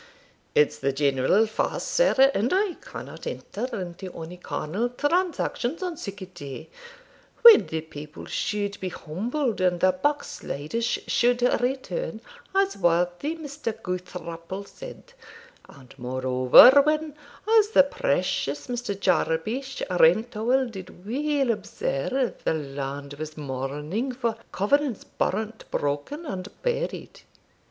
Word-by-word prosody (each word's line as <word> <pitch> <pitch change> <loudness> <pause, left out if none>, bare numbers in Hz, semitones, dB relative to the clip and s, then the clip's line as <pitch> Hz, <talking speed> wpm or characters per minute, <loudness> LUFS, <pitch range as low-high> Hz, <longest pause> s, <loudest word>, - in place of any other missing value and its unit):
'It's 450 -1 +3
the 140 - +1
general 140 +8 +3
fast, 220 - -2
sir, 275 - +5
and 225 +6 0
I 385 0 +2
cannot - - -9
enter 230 +5 -4
into 180 +1 -6
ony 165 +2 -8
carnal 180 +8 -2
transactions 320 0 -1
on 360 -2 -3
sic 200 -7 -7
a - - -6
day, 150 -7 -9 0.7
when 465 -3 +10
the 160 0 -3
people 150 -1 -10
should 205 -1 -2
be 185 - -3
humbled 225 - -3
and 180 -1 +2
the 185 - +5
backsliders 230 - -2
should 245 0 +1 0.2
return, 270 - -2 0.4
as 390 0 +2
worthy 175 - +1
Mr. 285 -8 -5
Goukthrapple 180 -1 -6
said; - - -11 0.6
and 130 -3 -15
moreover 130 - +7
when, 305 0 0 0.5
as 420 - +3
the 280 - +7
precious 145 - -1
Mr. 245 -5 -4
Jabesh 230 +12 0
Rentowel 220 +8 +3
did 190 -4 -10
weel 275 +2 +1
observe, 230 - -2
the - - +1
land 140 -1 -5
was 155 0 -6
mourning 150 - -3
for 235 -3 -1 0.2
covenants 260 +4 +1
burnt, 220 +2 -3
broken, 145 - -2
and 190 -8 -5 0.2
buried.' - - -3
205 Hz, 120 wpm, -25 LUFS, 160-270 Hz, 0.7 s, when